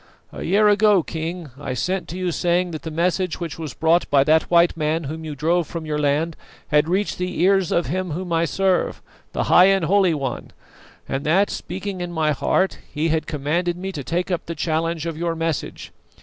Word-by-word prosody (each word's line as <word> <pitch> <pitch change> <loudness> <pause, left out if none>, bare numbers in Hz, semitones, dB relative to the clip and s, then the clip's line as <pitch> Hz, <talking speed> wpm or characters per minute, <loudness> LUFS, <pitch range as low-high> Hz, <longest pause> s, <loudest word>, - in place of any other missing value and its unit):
A - - -8
year 205 +4 +3
ago, 205 -3 +4
King, 165 -1 -5
I 130 -3 -4
sent 185 +9 -2
to 175 - -6
you 180 -1 -1
saying 175 +1 +1
that 155 - -6
the 160 - -6
message 175 +2 0
which 165 -2 -5
was 155 -5 -6
brought 165 +2 +2
by 140 -1 +5
that 155 +2 +3
white 170 0 +4
man 160 +1 -1
whom 160 +3 -6
you 155 -2 -5
drove 165 +3 +1
from 165 -2 -6
your 150 -1 -2
land 150 +3 +1 0.3
had 150 +1 +3
reached 195 +2 0
the 180 0 -3
ears 195 -1 +3
of 170 - +2
Him 185 +4 -2
whom 175 +2 -4
I 165 0 +2
serve, 190 +1 0 0.3
the - - 0
High 180 - +6
and 195 -3 +3
Holy 185 -1 +3
One, 135 -3 -4 0.6
and 135 +1 -3
that, 190 +6 +3
speaking 190 +1 -5
in 175 0 -4
my 160 -2 +1
heart, 150 +7 0
He 155 +2 -1
had 160 0 0
commanded 170 +4 -1
me 190 +2 -4
to 150 -7 -6
take 175 +6 -2
up 175 - -2
the 170 - -4
challenge 165 +1 -1
of 165 -2 -4
your 170 -1 -1
message. 165 -2 -3
170 Hz, 210 wpm, -22 LUFS, 155-180 Hz, 0.6 s, High